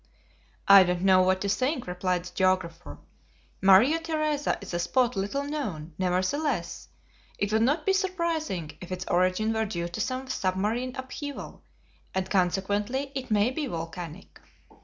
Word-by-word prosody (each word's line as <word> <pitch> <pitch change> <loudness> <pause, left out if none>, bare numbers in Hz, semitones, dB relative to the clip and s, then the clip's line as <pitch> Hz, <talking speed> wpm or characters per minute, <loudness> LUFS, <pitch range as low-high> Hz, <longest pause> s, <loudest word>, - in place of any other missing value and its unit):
"I 200 0 +10
don't 180 -1 0
know 190 -1 +6
what 185 0 +2
to 200 - -1
think," 255 +6 0
replied 180 0 -1
the 180 - -9
geographer; 180 -2 0 0.6
"Maria 205 +12 +6
Theresa 310 -3 -1
is 200 -3 -9
a 175 - 0
spot 245 +7 +1
little 205 +9 -2
known; 210 - -4
nevertheless, 185 - -1 0.5
it 205 +1 -1
would 220 - +3
not 290 +6 +1
be 390 - +3
surprising 335 - -2
if 180 0 -9
its 180 0 -4
origin 185 +5 +2
were 220 0 0
due 170 -4 -3
to 175 - -4
some 260 0 -3
submarine 220 +3 -1
upheaval, 275 +2 -7 0.5
and 190 0 -2
consequently 205 +8 0
it 260 -2 -5
may 210 +2 +3
be 290 +2 -3
volcanic." 165 -1 -7
200 Hz, 150 wpm, -27 LUFS, 185-265 Hz, 0.6 s, I